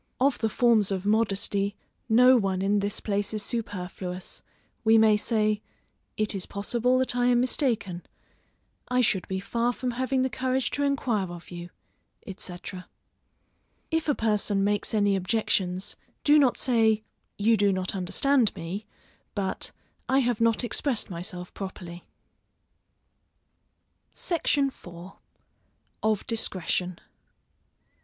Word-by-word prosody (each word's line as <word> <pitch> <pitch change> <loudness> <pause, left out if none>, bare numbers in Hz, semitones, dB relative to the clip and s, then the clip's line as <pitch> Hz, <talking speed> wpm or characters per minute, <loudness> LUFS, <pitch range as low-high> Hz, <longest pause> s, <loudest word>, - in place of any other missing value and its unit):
Of 270 +1 +2
the 220 - +1
forms 225 -4 +3
of 195 -1 -2
modesty, 200 -1 +1 0.3
no 250 +3 +7
one 195 -5 +1
in 205 +1 +2
this 200 0 -2
place 205 0 -2
is 210 - -2
superfluous: 185 -5 -5 0.4
we 225 0 +6
may 220 -1 +6
say, 215 -1 +1 0.6
"It 215 0 +1
is 195 -3 -4
possible 240 +5 0
that 260 -1 +1
I 245 0 +2
am 245 -1 +4
mistaken, 240 - 0 0.9
I 250 0 +2
should 195 -6 +1
be 190 0 -2
far 235 +5 0
from 250 +1 -3
having 260 +2 0
the 260 - +1
courage 260 0 0
to 285 - -2
enquire 245 -9 0
of 175 0 -10
you," 175 0 -7 0.7
&c. 180 -1 -7 1.3
If 325 -1 0
a 290 - +3
person 210 -2 +1
makes 205 +2 0
any 205 -2 +3
objections, 190 -1 0 0.3
do 300 +1 +6
not 265 -4 +3
say, 220 -4 +2 0.3
You 225 +3 +4
do 205 -1 +3
not 185 -1 -1
understand 225 +6 +2
me, 190 +6 -6 0.5
but, 195 -2 -2 0.4
I 265 - +4
have 245 -4 +1
not 230 +1 +3
expressed 240 -3 -1
myself 180 +1 -6
properly. 180 -3 -7 2.1
SECTION 295 -5 +1
IV. 175 -6 -11 0.9
_Of 215 -2 +1
Discretion. 185 -5 -1
215 Hz, 130 wpm, -27 LUFS, 195-245 Hz, 2.1 s, no